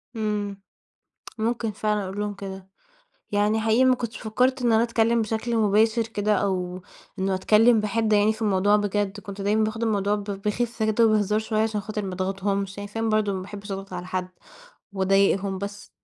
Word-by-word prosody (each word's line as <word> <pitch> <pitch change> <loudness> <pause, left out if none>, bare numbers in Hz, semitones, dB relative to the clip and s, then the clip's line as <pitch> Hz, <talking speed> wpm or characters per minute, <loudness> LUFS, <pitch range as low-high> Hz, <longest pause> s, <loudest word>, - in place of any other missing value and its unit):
امم، 205 -2 -2 0.8
ممكن 225 0 -1
فعلًا 210 0 -1
أقول 190 +2 -5
لهم 210 0 -2
كده 190 -1 -8 0.6
يعني، 210 +2 +2
حقيقي 225 +4 +3
ما 255 0 +5
كنتش 235 -2 -5
فكرت 255 +4 +1
إن 240 -1 +2
أنا 225 +1 +4
أتكلم 230 0 +2
بشكل 225 +2 -2
مباشر 220 +2 +3
كده، 210 -1 0
أو 185 -2 -1 0.4
إنه 190 0 +1
أتكلم 220 +4 +4
بحدة 215 0 +1
يعني 210 +2 +3
في 220 - -13
الموضوع 205 -1 +3
بجد. 205 0 -1
كنت 200 -1 -8
دايمًا 210 +2 +2
باخد 220 +1 -2
الموضوع 205 -2 +1
ب 205 - -5
بخفه 210 +3 -2
كده 230 +2 +4
وبهزار 210 -1 +2
شوية، 215 0 -1
عشان 215 -2 -1
خاطر 210 +1 -4
ما 190 - -4
اضغطهمش، 195 +1 -2
عشان 205 - -5
فعلًا 225 +2 -2
برضه 215 -2 +1
ما 190 - -3
باحبش 200 +1 -8
أضغط 195 0 -6
على 180 0 -5
حد 185 0 -3 0.6
وأضايقهم 195 0 +2
بس. 200 +1 -7
210 Hz, 180 wpm, -25 LUFS, 195-220 Hz, 0.8 s, ما